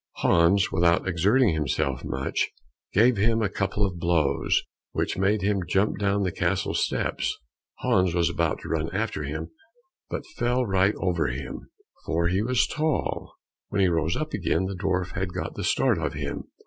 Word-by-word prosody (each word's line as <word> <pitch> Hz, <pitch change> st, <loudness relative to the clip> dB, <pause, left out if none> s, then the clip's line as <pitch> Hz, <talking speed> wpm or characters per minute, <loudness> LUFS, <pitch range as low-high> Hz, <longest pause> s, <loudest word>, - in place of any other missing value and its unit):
Hans, 85 Hz, +3 st, +3 dB
without 85 Hz, +2 st, +2 dB
exerting 100 Hz, +5 st, +3 dB
himself 70 Hz, -3 st, -1 dB
much, 65 Hz, +2 st, -1 dB, 0.4 s
gave 115 Hz, +3 st, +4 dB
him 115 Hz, +2 st, +2 dB
a 100 Hz, -, +1 dB
couple 100 Hz, +1 st, 0 dB
of 90 Hz, -3 st, -4 dB
blows 85 Hz, -4 st, +1 dB, 0.3 s
which -, -, -1 dB
made 100 Hz, +2 st, +1 dB
him 100 Hz, -1 st, +1 dB
jump 100 Hz, +2 st, +1 dB
down 100 Hz, 0 st, +1 dB
the 90 Hz, -, 0 dB
castle 90 Hz, +3 st, 0 dB
steps. -, -, -1 dB, 0.4 s
Hans 90 Hz, -2 st, +2 dB
was 85 Hz, -1 st, +3 dB
about -, -, 0 dB
to -, -, -8 dB
run 80 Hz, 0 st, -1 dB
after 110 Hz, -5 st, -1 dB
him, 80 Hz, +3 st, -5 dB, 0.6 s
but -, -, -4 dB
fell 125 Hz, +1 st, +1 dB
right 95 Hz, 0 st, +2 dB
over 90 Hz, -3 st, 0 dB
him, 65 Hz, +1 st, -6 dB, 0.3 s
for 85 Hz, +1 st, 0 dB
he 95 Hz, +3 st, +1 dB
was 115 Hz, -3 st, +2 dB
so -, -, -7 dB
tall. 155 Hz, -1 st, -1 dB, 0.3 s
When 100 Hz, -, -1 dB
he 95 Hz, -, +4 dB
rose 80 Hz, 0 st, 0 dB
up 155 Hz, 0 st, -3 dB
again, 90 Hz, +3 st, 0 dB
the 95 Hz, -, -3 dB
dwarf 90 Hz, -1 st, -1 dB
had 90 Hz, 0 st, -3 dB
got 95 Hz, -, -3 dB
the -, -, -5 dB
start -, -, +2 dB
of -, -, -2 dB
him. -, -, -4 dB
95 Hz, 175 wpm, -26 LUFS, 85-100 Hz, 0.6 s, gave